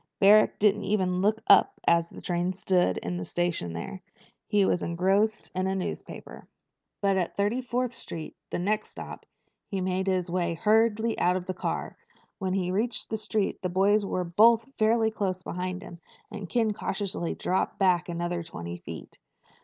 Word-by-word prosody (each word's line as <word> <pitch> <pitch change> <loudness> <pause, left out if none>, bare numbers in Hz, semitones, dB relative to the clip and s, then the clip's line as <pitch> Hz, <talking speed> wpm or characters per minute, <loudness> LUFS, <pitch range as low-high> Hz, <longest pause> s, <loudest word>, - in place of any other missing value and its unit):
Barrack 210 +2 +6
didn't 210 0 +2
even 185 -3 +1
look 215 +3 +1
up - - +5
as 170 0 +3
the - - -11
train 175 +1 0
stood 180 - +1
in 90 0 -3
the 90 - -3
station 170 - -2
there. 85 - -6 0.5
He 205 -2 +3
was 180 - +1
engrossed 195 +5 +1
in 185 +1 -1
a 190 - 0
newspaper. 190 - -6 0.5
But 195 -1 +2
at 180 -2 -2
Thirty 205 +5 +1
fourth 250 0 -2
Street, 165 -8 -7
the - - -2
next 210 +4 -1
stop, - - -9 0.4
he 195 - -3
made 185 +1 -1
his 185 -2 +1
way 170 -1 -1
hurriedly 220 +3 +2
out 180 +1 +3
of 185 -1 -3
the 185 - -3
car. 185 - -3 0.4
When 190 -2 -1
he 180 -2 0
reached 220 +5 -2
the - - +1
street 215 -1 -1
the 180 - -1
boys 200 +3 +3
were 185 -2 -1
both 225 +6 +4
fairly 220 0 +3
close 185 -4 -2
behind 185 +1 -4
him, 170 - -10 0.3
and 205 -5 -7
Ken 225 -3 +1
cautiously 195 -4 -3
dropped 185 - -1
back 180 -3 +2
another 175 0 -2
twenty 85 - -7
feet. 85 -2 -10
190 Hz, 175 wpm, -27 LUFS, 175-210 Hz, 0.5 s, Barrack